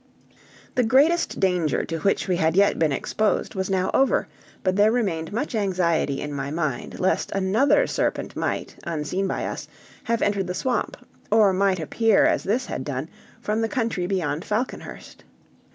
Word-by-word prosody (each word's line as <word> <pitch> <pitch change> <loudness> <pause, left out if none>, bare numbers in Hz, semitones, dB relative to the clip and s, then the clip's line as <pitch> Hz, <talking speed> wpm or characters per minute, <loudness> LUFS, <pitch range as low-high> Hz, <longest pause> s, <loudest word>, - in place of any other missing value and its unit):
The 250 - +2
greatest 285 +9 +3
danger 180 -5 +1
to 165 -1 -4
which 195 +5 +1
we 180 -2 +1
had 160 -1 +1
yet 200 +1 +3
been 160 -2 +2
exposed 210 +9 -1
was 190 -2 -2
now 190 -1 0
over, 270 - +2 0.4
but 185 -1 +1
there 205 +2 +5
remained 190 -9 -1
much 245 +7 -3
anxiety 180 -9 0
in 145 - -4
my 140 0 -3
mind 155 -4 -3
lest 185 - +1
another 215 - +3
serpent - - -2
might, - - -3
unseen 170 +4 -2
by - - -2
us, - - -5 0.4
have 230 0 0
entered 200 -2 0
the 180 - -3
swamp, 255 +4 -1 0.3
or 210 -3 +5
might 190 -1 +2
appear, 220 +6 +3
as - - +2
this 235 +6 0
had - - -4
done, 140 +2 -4 0.3
from 215 +2 -1
the 225 - 0
country 225 -8 -1
beyond 170 -5 -1
Falconhurst. 225 +5 -5
190 Hz, 170 wpm, -24 LUFS, 165-220 Hz, 0.4 s, there